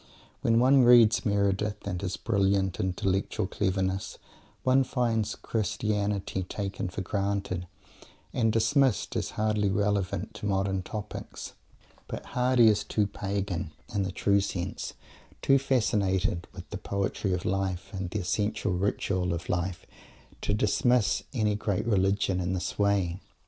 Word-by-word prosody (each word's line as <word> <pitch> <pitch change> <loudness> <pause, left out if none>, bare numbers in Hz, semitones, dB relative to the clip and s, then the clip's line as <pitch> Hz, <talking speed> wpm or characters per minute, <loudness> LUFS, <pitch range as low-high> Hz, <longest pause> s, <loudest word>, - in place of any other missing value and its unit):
When 115 0 +3
one 130 +3 +6
reads 120 -2 +6
Meredith, 100 +1 0
with 90 -3 -3
his 95 -2 -3
brilliant 100 -3 +1
intellectual 95 +3 0
cleverness, 95 0 -1 0.5
one 130 +1 +4
finds 115 -4 0
Christianity 105 -3 -1
"taken 95 0 -4
for 90 - -5
granted," 100 -2 -2 0.7
and 115 -3 +2
dismissed 115 - +2
as - - -1
hardly 105 -1 +1
relevant 100 -1 0
to 105 - -5
modern 95 -1 0
topics. 105 +3 -7 0.5
But - - -6
Mr. - - -15
Hardy 125 -2 +4
is 105 -1 +2
too 105 0 0
pagan, 95 -4 -3 0.2
in 100 - +1
the 95 -1 -1
true 100 +1 +2
sense, 95 -1 -4 0.5
too 135 0 +5
fascinated 105 -8 +1
by 90 -1 -9
the 105 - -4
poetry 100 0 -2
of 90 - -2
life 95 0 -2
and 95 -2 -3
the 105 +3 -2
essential 105 +4 -1
ritual 90 -1 0
of 85 - -7
life, 90 0 -2 0.6
to - - -1
dismiss 105 +3 +2
any 110 -5 +1
great 105 0 -1
religion 100 -3 +2
in 90 0 -1
this 90 +2 -3
way. 100 -3 +1
100 Hz, 140 wpm, -28 LUFS, 95-110 Hz, 0.7 s, one